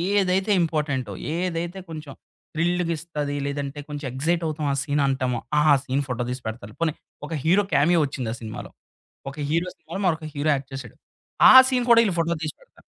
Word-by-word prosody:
ఏదైతే 195 +1 +2
ఇంపార్టెంటో, 145 -9 -1 0.2
ఏదైతే 175 +1 -3
కొంచెం 155 -3 -8 0.4
థ్రిల్‌గా 175 +1 0
ఇస్తది, 150 -3 -4
లేదంటే 140 0 -4
కొంచెం 145 0 -5
ఎగ్జైట్ 165 +7 0
అవుతాం 155 -1 -3
ఆ - - 0
సీన్ 145 0 0
అంటామో, 130 -3 0 0.2
ఆ - - +4 0.2
సీన్ 135 +1 -1
ఫోటో 125 -1 -2
తీసి 125 +1 -4
పెడతారు. 110 -1 -7
పోనీ, 165 -2 +1 0.3
ఒక - - -6
హీరో 185 +6 +4
కామియో 165 +4 +4
ఒచ్చింది 130 -5 -4
ఆ - - -6
సినిమాలో. 110 -1 -7 0.6
ఒక 140 - -15
హీరో 165 +4 +1
సినిమాలో - - -7
మరొక 160 -3 0
హీరో 145 +2 0
యాక్ట్ 135 -1 -6
చేసాడు, 130 -5 -8 0.6
ఆ - - +8 0.2
సీన్ 250 -2 +1
కూడా 235 -1 +8
వీళ్ళు 195 -6 0
ఫోటో 165 +1 +1
తీసిపెడతరు. 160 - -9
155 Hz, 175 wpm, -24 LUFS, 135-170 Hz, 0.6 s, ఆ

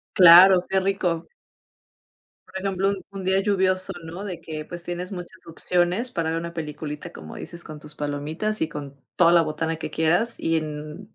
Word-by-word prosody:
Claro, 180 +1 +9
qué 190 0 +2
rico. 185 -4 -1 1.2
Por 190 - -6
ejemplo, 195 0 0 0.2
un 195 -2 -7
día 190 +1 +3
lluvioso, 190 -1 +1
¿no?, 175 +5 -7
de 180 -4 -6
que 155 -1 -6
pues 175 +1 -8
tienes 175 +2 -5
muchas 180 0 -9
opciones 175 +7 0
para 165 -8 -1
ver 165 - -1
una 170 0 -6
peliculita, 150 -2 -6
como 80 0 -10
dices, 170 0 -6
con 155 -1 -9
tus 150 0 -9
palomitas 150 +9 -3
y 160 - +1
con 140 -3 -8 0.2
toda 170 -1 +5
la 170 -1 +6
botana 160 +1 -2
que 160 - -6
quieras, 175 +9 +2
y 165 0 +1
en 155 +5 -6
170 Hz, 180 wpm, -24 LUFS, 155-190 Hz, 1.2 s, Claro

